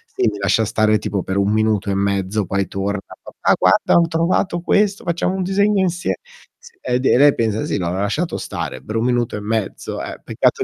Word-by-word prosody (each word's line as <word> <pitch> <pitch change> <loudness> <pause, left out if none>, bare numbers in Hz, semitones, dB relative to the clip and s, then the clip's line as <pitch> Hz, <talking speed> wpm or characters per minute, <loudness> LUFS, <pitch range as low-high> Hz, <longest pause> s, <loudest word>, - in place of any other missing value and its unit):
lei - - +2
mi 105 - -7
lascia 100 +3 +2
stare 110 +1 +2
tipo 100 - -2
per 95 +1 -3
1 100 +1 +2
minuto 110 -2 +1
e 95 - 0
mezzo, 100 +1 0
poi 95 -1 -1
torna: 100 +2 -2 0.2
"Papà, - - 0
guarda - - +3
ho 170 - +1
trovato 170 +2 0
questo, 200 +2 +1
facciamo 170 +1 0
un 190 - -1
disegno 200 +1 +2
insie" 175 -1 -1 0.5
Sì. 470 -4 -16
Ed 125 +2 -1
e - - +5
lei 145 +1 +6
pensa: 110 -1 0
"Sì, - - -1
l'ho 85 - -1
lasciato 105 - -1
stare 65 - -5
per 110 - -6
un 115 - +1
minuto 120 -2 0
e - - -3
mezzo." 110 -1 -3
Eh, - - -7
peccato - - +1
110 Hz, 210 wpm, -19 LUFS, -, 0.5 s, lei